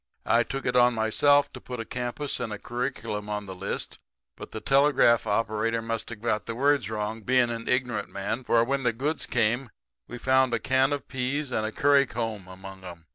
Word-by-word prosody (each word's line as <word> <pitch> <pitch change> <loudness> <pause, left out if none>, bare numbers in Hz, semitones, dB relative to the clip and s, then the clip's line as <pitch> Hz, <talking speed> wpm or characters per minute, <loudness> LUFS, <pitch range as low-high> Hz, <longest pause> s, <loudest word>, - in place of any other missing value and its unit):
I 115 - +4
took 135 +4 -4
it 125 - 0
on 125 -1 +5
myself 145 +6 +3
to - - -9
put 125 -1 -7
a 115 - -4
campus 125 +4 -3
and 115 -3 -3
a 105 - -4
curriculum 120 -4 -4
on 105 -1 -3
the 95 - -7
list; 90 - -5 0.4
but - - -9
the 110 - -6
telegraph 135 -4 +4
operator 110 +2 0
must 115 -1 -3
have 115 -2 -9
got 110 -2 -1
the 115 - -3
words 140 -1 +2
wrong, 110 +1 -3
being 125 +1 +2
an 115 0 -5
ignorant 125 -4 0
man, 105 +6 -3
for 115 -1 +3
when 135 +3 -1
the 120 -3 +1
goods 145 +7 -2
come 120 +4 +1 0.4
we 120 - -7
found 130 -1 +3
a - - -1
can 130 +3 +2
of 145 -1 -3
peas 130 +2 -2
and 110 -2 0
a - - -4
curry 140 +2 +4
comb 110 -5 -4
among 95 +1 -11
'em. 85 -2 -10
120 Hz, 210 wpm, -27 LUFS, 110-130 Hz, 0.4 s, on